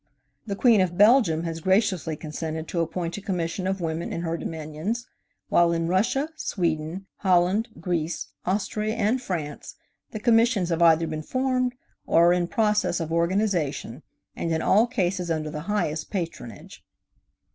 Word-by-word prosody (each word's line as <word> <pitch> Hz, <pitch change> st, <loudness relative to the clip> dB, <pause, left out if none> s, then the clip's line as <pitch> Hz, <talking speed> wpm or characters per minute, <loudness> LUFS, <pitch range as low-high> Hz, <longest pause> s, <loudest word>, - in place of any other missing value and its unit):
The 200 Hz, -, -2 dB
Queen 225 Hz, -1 st, +5 dB
of 175 Hz, -1 st, -1 dB
Belgium 205 Hz, -7 st, +5 dB
has 165 Hz, -1 st, -4 dB
graciously 185 Hz, -3 st, +1 dB
consented 160 Hz, +1 st, -5 dB
to 175 Hz, -, -2 dB
appoint 170 Hz, +1 st, -2 dB
a -, -, -6 dB
commission 185 Hz, -1 st, -2 dB
of 190 Hz, 0 st, -2 dB
women 165 Hz, 0 st, -3 dB
in 165 Hz, -, -3 dB
her 165 Hz, -1 st, -2 dB
dominions; 160 Hz, +9 st, -4 dB, 0.4 s
while 170 Hz, -1 st, +4 dB
in 165 Hz, 0 st, 0 dB
Russia, 230 Hz, -, +1 dB
Sweden, 170 Hz, -, -2 dB
Holland, 185 Hz, +3 st, +2 dB
Greece, 170 Hz, -3 st, -2 dB
Austria 210 Hz, +3 st, -1 dB
and 230 Hz, +3 st, +1 dB
France 160 Hz, -, -5 dB, 0.3 s
the 215 Hz, -, -6 dB
commissions 225 Hz, -4 st, +3 dB
have 170 Hz, 0 st, 0 dB
either 165 Hz, -1 st, +5 dB
been 155 Hz, -1 st, -4 dB
formed 255 Hz, +5 st, 0 dB, 0.3 s
or 170 Hz, +1 st, +5 dB
are -, -, +5 dB
in 175 Hz, -1 st, 0 dB
process 210 Hz, 0 st, +1 dB
of 165 Hz, -1 st, -3 dB
organization, 170 Hz, -, 0 dB, 0.3 s
and 165 Hz, -, -2 dB
in 160 Hz, 0 st, 0 dB
all 220 Hz, +5 st, +4 dB
cases 185 Hz, -6 st, -1 dB
under 155 Hz, -2 st, -2 dB
the 150 Hz, -, -5 dB
highest 165 Hz, -7 st, -1 dB
patronage. 165 Hz, -, -6 dB
175 Hz, 155 wpm, -25 LUFS, 165-210 Hz, 0.4 s, Queen